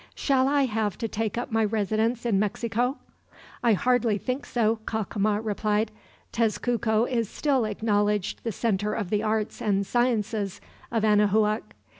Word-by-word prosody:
"Shall 265 Hz, -2 st, +2 dB
I 285 Hz, 0 st, +3 dB
have 215 Hz, -5 st, -1 dB
to 225 Hz, -, -2 dB
take 220 Hz, +1 st, -3 dB
up 240 Hz, -, -3 dB
my 225 Hz, 0 st, +2 dB
residence 220 Hz, +3 st, 0 dB
in 210 Hz, -5 st, +2 dB
Mexico?" 235 Hz, +5 st, -1 dB, 0.6 s
"I 235 Hz, -2 st, +4 dB
hardly 235 Hz, 0 st, +2 dB
think 255 Hz, +6 st, -4 dB
so," 225 Hz, -2 st, +1 dB
Cacama 210 Hz, -1 st, 0 dB
replied. 210 Hz, +1 st, 0 dB, 0.4 s
"Tezcuco 230 Hz, 0 st, +1 dB
is 235 Hz, -4 st, -1 dB
still 270 Hz, -6 st, +1 dB
acknowledged 210 Hz, -1 st, 0 dB
the 230 Hz, -, -1 dB
center 210 Hz, -1 st, -1 dB
of 205 Hz, -5 st, -3 dB
the 210 Hz, -1 st, +2 dB
arts 215 Hz, 0 st, -1 dB
and 200 Hz, -2 st, +1 dB
sciences 220 Hz, -4 st, 0 dB, 0.3 s
of 225 Hz, -2 st, +1 dB
Anahuac. 210 Hz, 0 st, +2 dB
220 Hz, 145 wpm, -26 LUFS, 210-235 Hz, 0.6 s, I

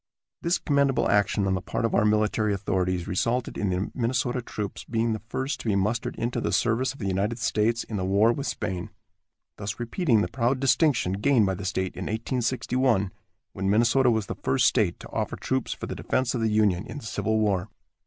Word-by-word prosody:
This 170 Hz, +2 st, +2 dB
commendable 140 Hz, -2 st, +2 dB
action 105 Hz, 0 st, +2 dB
on 95 Hz, -, +1 dB
the 95 Hz, -, -1 dB
part 115 Hz, -, -2 dB
of 115 Hz, -, -1 dB
our 105 Hz, -, +3 dB
military 105 Hz, 0 st, +2 dB
authorities 90 Hz, -2 st, -1 dB
resulted 120 Hz, +7 st, -1 dB
in 100 Hz, -, -1 dB
the 90 Hz, +2 st, -1 dB
Minnesota 125 Hz, 0 st, 0 dB
troops 105 Hz, -3 st, -5 dB
being 115 Hz, 0 st, 0 dB
the 110 Hz, -, -3 dB
first 135 Hz, +4 st, -2 dB
to -, -, -7 dB
be 105 Hz, -, +2 dB
mustered 110 Hz, +4 st, 0 dB
into 120 Hz, +1 st, -2 dB
the -, -, -1 dB
service 120 Hz, +2 st, +1 dB
of -, -, -12 dB
the 105 Hz, -, -5 dB
United 100 Hz, +4 st, 0 dB
States 115 Hz, 0 st, +1 dB
in 110 Hz, -, -5 dB
the 95 Hz, -, -2 dB
war 100 Hz, +5 st, +4 dB
with 140 Hz, +3 st, -4 dB
Spain, 90 Hz, -2 st, -3 dB, 0.7 s
thus 105 Hz, +1 st, -5 dB
repeating 120 Hz, -, +1 dB
the -, -, 0 dB
proud 130 Hz, +1 st, 0 dB
distinction 135 Hz, -, +2 dB
gained 110 Hz, +3 st, +3 dB
by 95 Hz, -, 0 dB
the 95 Hz, +1 st, -6 dB
state 95 Hz, -1 st, -2 dB
in 95 Hz, -, -5 dB
1861, 120 Hz, -2 st, 0 dB, 0.4 s
when 95 Hz, +1 st, -2 dB
Minnesota 120 Hz, +5 st, +4 dB
was 110 Hz, -3 st, +1 dB
the -, -, -4 dB
first 130 Hz, -1 st, +1 dB
state 105 Hz, -9 st, +2 dB
to -, -, -10 dB
offer -, -, -2 dB
troops 130 Hz, -1 st, -2 dB
for -, -, -5 dB
the -, -, -5 dB
defense 130 Hz, -1 st, -1 dB
of 120 Hz, -, -1 dB
the 110 Hz, -, +2 dB
Union 105 Hz, -2 st, +2 dB
in -, -, -7 dB
the 140 Hz, -, -8 dB
Civil 110 Hz, 0 st, -1 dB
War. 100 Hz, -2 st, 0 dB
110 Hz, 210 wpm, -26 LUFS, 100-125 Hz, 0.7 s, war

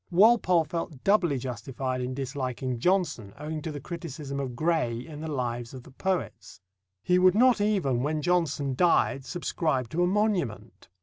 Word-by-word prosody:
Walpole 185 Hz, -2 st, +5 dB
felt 155 Hz, -3 st, -5 dB
doubly 185 Hz, -8 st, +3 dB
justified 125 Hz, +1 st, -4 dB
in 125 Hz, +1 st, -3 dB
disliking 130 Hz, -2 st, -3 dB
Johnson 175 Hz, -, 0 dB
owing 155 Hz, +1 st, -5 dB
to 160 Hz, -, -4 dB
the 145 Hz, -, -6 dB
criticism 145 Hz, -3 st, -6 dB
of 130 Hz, -3 st, -4 dB
Gray 155 Hz, -6 st, 0 dB
in 150 Hz, -2 st, -9 dB
the 160 Hz, -, -4 dB
Lives 120 Hz, -2 st, -3 dB
of 130 Hz, -, -9 dB
the -, -, -15 dB
Poets. 140 Hz, -, -3 dB, 0.4 s
He 180 Hz, 0 st, +3 dB
would 185 Hz, 0 st, +5 dB
not 245 Hz, -1 st, +5 dB
even, 180 Hz, -, +1 dB
when 150 Hz, +2 st, -1 dB
Johnson 160 Hz, -6 st, +1 dB
died, 135 Hz, -3 st, +2 dB
subscribe 155 Hz, -7 st, -1 dB
to 165 Hz, +8 st, -1 dB
a 175 Hz, -, +4 dB
monument. 180 Hz, -, -1 dB
150 Hz, 165 wpm, -27 LUFS, 130-175 Hz, 0.4 s, Walpole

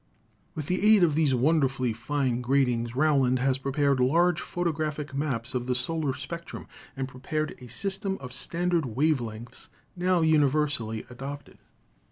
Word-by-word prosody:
With 155 Hz, -, -4 dB
the 180 Hz, +5 st, -1 dB
aid 200 Hz, -, +4 dB
of 160 Hz, -3 st, +3 dB
these 150 Hz, -3 st, +2 dB
wonderfully 135 Hz, -3 st, +1 dB
fine 130 Hz, 0 st, -1 dB
gratings 125 Hz, -2 st, +1 dB
Rowland 135 Hz, -3 st, +3 dB
has 130 Hz, +1 st, +1 dB
prepared 140 Hz, 0 st, +1 dB
large 165 Hz, +7 st, +3 dB
photographic 155 Hz, -4 st, -3 dB
maps 130 Hz, -4 st, -2 dB
of 125 Hz, -1 st, -2 dB
the 125 Hz, -, +1 dB
solar 140 Hz, +2 st, -1 dB
spectrum 170 Hz, 0 st, -7 dB, 0.3 s
and 135 Hz, -1 st, -2 dB
prepared 145 Hz, +4 st, -3 dB
a 125 Hz, -, -10 dB
system 195 Hz, -, -2 dB
of 125 Hz, -2 st, -9 dB
standard 170 Hz, +3 st, 0 dB
wave 150 Hz, -2 st, +3 dB
lengths 115 Hz, +1 st, -9 dB, 0.3 s
now 180 Hz, -1 st, +2 dB
universally 145 Hz, -7 st, +2 dB
adopted. 140 Hz, +3 st, -8 dB
140 Hz, 145 wpm, -27 LUFS, 125-160 Hz, 0.3 s, aid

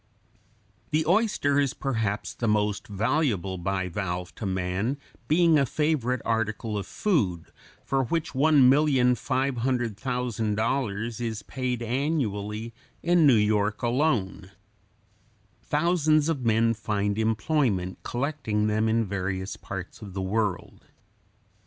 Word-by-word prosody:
] 105 Hz, -3 st, -37 dB
The 155 Hz, +1 st, +1 dB
oyster 175 Hz, -7 st, +2 dB
is 140 Hz, -2 st, 0 dB
perhaps 110 Hz, -6 st, -2 dB
the 115 Hz, -, -3 dB
most 105 Hz, -1 st, 0 dB
valuable 105 Hz, -, 0 dB
bivalve 90 Hz, -1 st, -3 dB
to 105 Hz, -, -5 dB
man, 95 Hz, +7 st, -1 dB, 0.3 s
being 165 Hz, 0 st, +4 dB
a 140 Hz, -, +3 dB
favorite 130 Hz, -5 st, 0 dB
article 110 Hz, -1 st, -1 dB
of 100 Hz, -, -3 dB
food, 100 Hz, -, -1 dB, 0.3 s
for 135 Hz, -1 st, +1 dB
which 165 Hz, +6 st, -2 dB
$1,500,000 125 Hz, -5 st, +1 dB
is 110 Hz, -2 st, -3 dB
paid 125 Hz, -2 st, -3 dB
annually 115 Hz, -5 st, -2 dB, 0.3 s
in 175 Hz, -3 st, +4 dB
New 130 Hz, -, +6 dB
York 105 Hz, 0 st, +1 dB
alone. 120 Hz, -, 0 dB, 1.1 s
Thousands 155 Hz, +1 st, +2 dB
of 145 Hz, -6 st, -1 dB
men 115 Hz, 0 st, +3 dB
find 105 Hz, -1 st, -1 dB
employment 110 Hz, -, 0 dB
collecting 120 Hz, -5 st, -2 dB
them 110 Hz, +1 st, +1 dB
in 115 Hz, 0 st, +2 dB
various 95 Hz, -1 st, -3 dB
parts 95 Hz, +2 st, -8 dB
of 100 Hz, -3 st, -9 dB
the 95 Hz, -, -2 dB
world. 100 Hz, 0 st, -2 dB
115 Hz, 110 wpm, -26 LUFS, 105-140 Hz, 1.1 s, New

